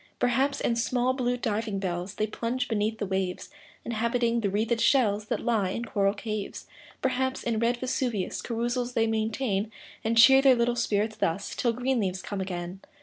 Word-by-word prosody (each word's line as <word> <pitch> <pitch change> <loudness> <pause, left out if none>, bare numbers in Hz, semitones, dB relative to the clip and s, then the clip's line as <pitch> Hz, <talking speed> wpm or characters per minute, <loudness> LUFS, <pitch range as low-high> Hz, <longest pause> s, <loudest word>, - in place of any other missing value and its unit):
Perhaps, 260 +3 +1
in 235 - +1
small, 250 +2 +1
blue 245 -1 0
diving 220 -3 -2
bells 180 -1 -3
They 215 - 0
plunge 240 +4 -2
beneath 220 0 0
the 210 - -2
waves, 190 -1 -3 0.3
Inhabiting 235 +1 0
the 205 -3 0
wreathed 225 +4 0
shells 215 -6 +3
That - - -2
lie 220 -6 +1
in 235 +5 -3
coral 200 -2 +1
caves. 215 -1 -5 0.4
Perhaps, 260 0 0
in 230 -2 0
red 235 +1 +1
Vesuvius 245 -6 -2
Carousals 240 +1 -2
they 225 -2 +2
maintain; 220 -1 -1 0.3
And 230 +1 0
cheer 265 +4 +8
their 270 -2 +6
little 240 0 +1
spirits 215 -2 0
thus, 180 +5 -1
Till 235 -2 0
green 250 +2 0
leaves 185 -3 -2
come 200 -2 -4
again. 180 0 -5
225 Hz, 175 wpm, -27 LUFS, 205-245 Hz, 0.4 s, cheer